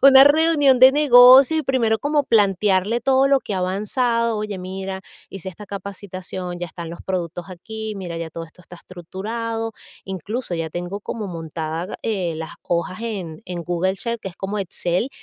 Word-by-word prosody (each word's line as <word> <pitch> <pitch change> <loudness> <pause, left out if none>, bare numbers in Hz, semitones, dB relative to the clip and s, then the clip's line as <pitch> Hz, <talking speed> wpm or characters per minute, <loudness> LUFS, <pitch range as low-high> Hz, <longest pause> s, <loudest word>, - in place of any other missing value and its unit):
Una 270 -1 +9
reunión 290 -3 +4
de 260 +1 +8
negocio 265 0 +7
y 315 - +1
primero 230 -4 +1
como 290 0 +1
plantearle 205 -1 +2
todo 270 0 +3
lo 275 -1 +3
que - - -6
ha - - -1
avanzado. 230 +5 0
Oye, 210 -2 -4
mira, 190 +1 -5 0.3
hice 195 -1 -6
esta 190 +3 -10
capacitación, 185 -2 -6
ya 175 - -2
están 170 0 -8
los 170 - -9
productos 175 -2 -4
aquí, 220 +4 -6
mira, 175 -3 -6
ya 165 -1 -4
todo 165 +1 -6
esto 165 +2 -18
está 175 0 -13
estructurado. 225 +6 -5 0.3
Incluso, 190 +3 -4
ya 165 -1 -2
tengo 175 +4 -5
como 210 0 -5
montada, 165 +1 -5
eh, 190 -7 -1
las 160 0 -6
hojas 175 +2 -2
en 200 -7 -5
en 175 -2 -5
Google 180 +2 0
Sheets, 235 +2 -4
que 195 - -5
es 180 - -14
como 200 +2 -4
Excel. 180 +4 -2
195 Hz, 175 wpm, -21 LUFS, 175-235 Hz, 0.3 s, Una